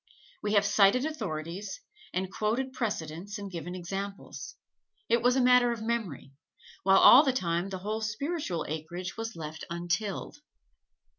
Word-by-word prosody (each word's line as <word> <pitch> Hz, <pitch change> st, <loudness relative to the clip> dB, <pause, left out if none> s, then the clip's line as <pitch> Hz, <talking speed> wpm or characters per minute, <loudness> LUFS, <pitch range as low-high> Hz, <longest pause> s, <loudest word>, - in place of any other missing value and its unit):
We 210 Hz, 0 st, -1 dB
have 205 Hz, -1 st, +4 dB
cited 205 Hz, +5 st, +4 dB
authorities 195 Hz, -, -4 dB, 0.3 s
and 185 Hz, +1 st, -3 dB
quoted 245 Hz, +5 st, -1 dB
precedents 200 Hz, -4 st, -3 dB
and 200 Hz, -1 st, -7 dB
given 175 Hz, +1 st, -5 dB
examples: 195 Hz, +3 st, -6 dB, 0.5 s
it 235 Hz, -, +3 dB
was 245 Hz, +1 st, +4 dB
a 265 Hz, -, +3 dB
matter 250 Hz, -1 st, +5 dB
of 230 Hz, -2 st, -4 dB
memory; 220 Hz, -, -3 dB, 0.5 s
while 195 Hz, 0 st, +5 dB
all 255 Hz, -, +10 dB
the 270 Hz, -, +2 dB
time 175 Hz, -6 st, -1 dB
the 190 Hz, -, -4 dB
whole 210 Hz, +4 st, -3 dB
spiritual 220 Hz, -, -2 dB
acreage 170 Hz, +4 st, -5 dB
was 225 Hz, 0 st, -5 dB
left 160 Hz, -1 st, -7 dB
untilled. 175 Hz, +7 st, -3 dB
200 Hz, 145 wpm, -29 LUFS, 175-235 Hz, 0.5 s, all